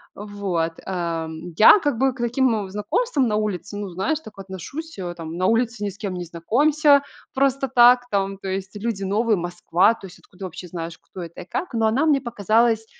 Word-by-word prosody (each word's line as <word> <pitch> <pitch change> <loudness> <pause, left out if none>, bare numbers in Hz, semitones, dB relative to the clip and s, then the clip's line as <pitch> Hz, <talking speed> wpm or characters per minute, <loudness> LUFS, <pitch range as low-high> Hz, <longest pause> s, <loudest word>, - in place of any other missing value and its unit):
Вот, 195 -5 -2
эм, 165 -2 -4
я 220 - +8
как 290 -9 -1
бы 265 0 +2
к 255 - -15
таким 235 -4 +1
знакомствам 260 - 0
на 210 - 0
улице, 205 -2 -3
ну, 205 -1 -4
знаешь, 195 - -1
так 215 -8 -14
отношусь, 195 - -8
э, 175 -2 -4
там. 165 -1 -7
На 185 +1 +1
улице 230 -1 +1
ни 200 - -1
с 195 - -15
кем 195 -3 -4
не 180 -1 -4
знакомься 280 - +3 0.3
просто 270 0 +1
так. 245 0 +6
Там, 195 -1 -1
то 195 - -7
есть, 190 +1 -4
люди 210 -4 -2
новые, 215 +3 +1
Москва. 175 +3 +2
То 210 -4 -11
есть 180 - -14
откуда 185 +1 -10
вообще 180 +1 -9
знаешь, 165 -1 -6
кто 185 - -10
это 170 -1 -8
и - - -10
как? 365 - -3
Но 225 -1 +2
она 250 +8 +2
мне 285 -3 +4
показалась, 225 -1 +1
205 Hz, 205 wpm, -22 LUFS, 180-245 Hz, 0.3 s, я